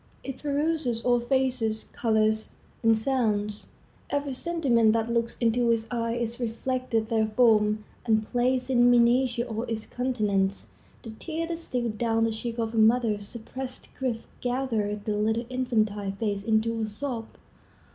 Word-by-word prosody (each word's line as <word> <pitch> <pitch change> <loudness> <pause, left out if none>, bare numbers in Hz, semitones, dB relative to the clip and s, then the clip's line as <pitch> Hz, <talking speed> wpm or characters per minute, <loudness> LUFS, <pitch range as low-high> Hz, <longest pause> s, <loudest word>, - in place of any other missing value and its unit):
It 270 -1 -6
peruses 290 -5 0
all 245 -1 +4
faces, 245 -3 0
colors, 220 -1 +1 0.3
and 225 -1 +4
sounds. 215 -4 -1 0.4
Every 285 -1 -1
sentiment 255 -8 +2
that 230 +1 0
looks 235 0 0
into 235 0 +2
its 230 -1 +2
eye 230 -1 -1
is 235 0 -3
reflected 240 -1 -1
therefrom, 215 -1 +3 0.2
and 220 -2 +2
plays 250 +2 +1
in 245 -1 +5
miniature 240 0 +3
on 225 +1 -4
its 220 -1 -3
countenance. 210 -6 -1 0.3
The 225 - -7
tear 320 +8 -4
that 335 0 -4
steals 245 -8 -2
down 225 -1 +1
the 225 - +2
cheek 230 +1 -4
of 225 -1 -2
a 225 - +1
mother's 220 -2 +3
suppressed 255 +3 -7
grief 245 -4 -3
gathers 230 -5 -1
the 210 - 0
little 220 +3 0
infantile 215 -6 0
face 200 -1 -2
into 225 +1 +1
a 220 - -1
sob. 225 +1 -4
230 Hz, 145 wpm, -27 LUFS, 220-250 Hz, 0.4 s, in